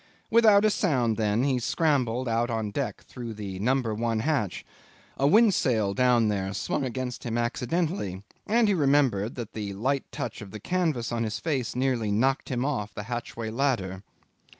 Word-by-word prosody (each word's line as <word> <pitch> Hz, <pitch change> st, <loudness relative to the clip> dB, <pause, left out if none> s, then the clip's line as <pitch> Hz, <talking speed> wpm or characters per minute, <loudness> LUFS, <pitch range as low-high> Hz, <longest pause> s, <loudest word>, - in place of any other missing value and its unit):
Without 215 Hz, -2 st, +6 dB
a 215 Hz, -, +4 dB
sound, 125 Hz, -, +1 dB
then, 105 Hz, +2 st, +1 dB
he 135 Hz, -2 st, +1 dB
scrambled 130 Hz, -3 st, +1 dB
out 115 Hz, +1 st, +1 dB
on 110 Hz, -3 st, -2 dB
deck -, -, -3 dB
through 120 Hz, -3 st, -7 dB
the 100 Hz, -3 st, -6 dB
number 125 Hz, +1 st, +1 dB
one 115 Hz, 0 st, -1 dB
hatch. 125 Hz, -, -1 dB, 0.5 s
A 140 Hz, -, +2 dB
windsail 145 Hz, -, +4 dB
rigged 100 Hz, -, -5 dB
down 125 Hz, -3 st, +4 dB
there 100 Hz, -1 st, -1 dB
swung 115 Hz, -, -1 dB
against 130 Hz, -1 st, -4 dB
him 115 Hz, -1 st, -2 dB
accidentally, 125 Hz, -, -1 dB, 0.2 s
and 225 Hz, +1 st, +3 dB
he 205 Hz, -, +3 dB
remembered 135 Hz, -, +2 dB
that 115 Hz, -3 st, -6 dB
the 105 Hz, -2 st, -4 dB
light 130 Hz, +7 st, -1 dB
touch 120 Hz, -3 st, -5 dB
of 105 Hz, -, -8 dB
the 110 Hz, -, -8 dB
canvas 155 Hz, -, -1 dB
on 115 Hz, -1 st, -1 dB
his 110 Hz, -2 st, -2 dB
face 135 Hz, -8 st, -2 dB
nearly 125 Hz, -5 st, 0 dB
knocked 130 Hz, +6 st, +1 dB
him 125 Hz, -1 st, -1 dB
off 105 Hz, -8 st, -2 dB
the 105 Hz, -, -5 dB
hatchway 115 Hz, -1 st, -5 dB
ladder. 115 Hz, -8 st, -1 dB
120 Hz, 175 wpm, -27 LUFS, 110-140 Hz, 0.5 s, Without